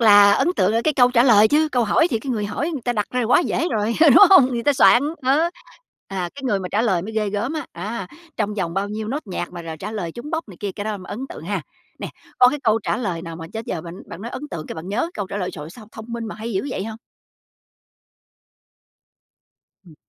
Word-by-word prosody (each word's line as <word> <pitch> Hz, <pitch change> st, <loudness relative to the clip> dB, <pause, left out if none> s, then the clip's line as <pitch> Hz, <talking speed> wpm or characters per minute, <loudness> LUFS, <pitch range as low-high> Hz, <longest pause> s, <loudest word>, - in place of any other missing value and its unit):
là 205 Hz, -2 st, +7 dB
ấn 275 Hz, -, +2 dB
tượng 185 Hz, +3 st, +2 dB
ở 230 Hz, -, +2 dB
cái 310 Hz, -, +1 dB
câu 245 Hz, -1 st, +5 dB
trả 240 Hz, -1 st, +4 dB
lời, 220 Hz, -4 st, +6 dB
chứ 310 Hz, +1 st, +3 dB
câu 245 Hz, -2 st, +2 dB
hỏi 325 Hz, -, +3 dB
thì 230 Hz, -, 0 dB
cái 260 Hz, +4 st, -5 dB
người 210 Hz, -4 st, -1 dB
hỏi 260 Hz, +11 st, -2 dB
người 280 Hz, -7 st, -5 dB
ta 245 Hz, -, +1 dB
đặt 210 Hz, -3 st, -1 dB
ra 250 Hz, 0 st, 0 dB
quá 245 Hz, +9 st, +4 dB
dễ 345 Hz, 0 st, -1 dB
rồi, 215 Hz, +1 st, -1 dB
ừ, 320 Hz, -2 st, +7 dB
đúng -, -, +9 dB
hông? 325 Hz, -10 st, +8 dB
Người 235 Hz, -1 st, -2 dB
ta 290 Hz, -, +3 dB
soạn, 255 Hz, -1 st, +5 dB, 0.2 s
ờ. 270 Hz, +4 st, +3 dB, 0.7 s
À, 185 Hz, -3 st, -3 dB
cái 280 Hz, -, -10 dB
người 210 Hz, -6 st, +1 dB
mà 180 Hz, -, -5 dB
trả 215 Hz, +3 st, +2 dB
lời 190 Hz, -7 st, +1 dB
mới 220 Hz, +3 st, -7 dB
ghê 210 Hz, -2 st, 0 dB
gớm 220 Hz, +8 st, -2 dB
á, 310 Hz, -4 st, -4 dB
á, 195 Hz, +2 st, -5 dB, 0.3 s
trong 210 Hz, -1 st, -1 dB
vòng 175 Hz, -4 st, -3 dB
bao 195 Hz, +1 st, -1 dB
nhiêu 215 Hz, +1 st, -5 dB
nốt 280 Hz, -1 st, -4 dB
nhạc 180 Hz, -2 st, -5 dB
mà 175 Hz, -1 st, -7 dB
r -, -, -12 dB
trả 210 Hz, -, -5 dB
lời 175 Hz, -6 st, -4 dB
trúng 270 Hz, +6 st, -8 dB
bóc 325 Hz, -7 st, -3 dB
này 185 Hz, -, -12 dB
kia, 200 Hz, -2 st, -3 dB
cái 205 Hz, -, -6 dB
đó 215 Hz, -1 st, -2 dB
mới 185 Hz, -, -11 dB
ấn 215 Hz, -, -5 dB
tượng -, -, -9 dB
ha. 190 Hz, -2 st, -2 dB, 0.4 s
Nè, -, -, -5 dB, 0.3 s
có 250 Hz, -, +8 dB
cái 295 Hz, -, -2 dB
câu 220 Hz, 0 st, +3 dB
trả -, -, -1 dB
lời 185 Hz, -8 st, -3 dB
nào 165 Hz, -2 st, -7 dB
mà 165 Hz, -1 st, -8 dB
đến 225 Hz, 0 st, -5 dB
giờ 165 Hz, -, -3 dB
bạn 170 Hz, 0 st, -8 dB
bạn 170 Hz, -, -9 dB
nói 235 Hz, -, -5 dB
ấn 255 Hz, -, -7 dB
tượng 155 Hz, -2 st, -6 dB
cái -, -, -6 dB
bạn 160 Hz, +3 st, -8 dB
nhớ 235 Hz, +12 st, -1 dB
câu 200 Hz, -, -4 dB
trả 200 Hz, -, -6 dB
lời: 185 Hz, -2 st, -2 dB
"Trời 150 Hz, -, -8 dB
ơi, 160 Hz, -, -10 dB
sao 215 Hz, +2 st, -13 dB
thông 220 Hz, -, -9 dB
minh 235 Hz, -1 st, -4 dB
mà -, -, -6 dB
hay 220 Hz, +2 st, -6 dB
dữ 190 Hz, +8 st, -2 dB
vậy!" 195 Hz, -, -3 dB
hông? 220 Hz, 0 st, -7 dB, 2.9 s
Ừm. 160 Hz, -, -15 dB
215 Hz, 275 wpm, -21 LUFS, 195-245 Hz, 2.9 s, đúng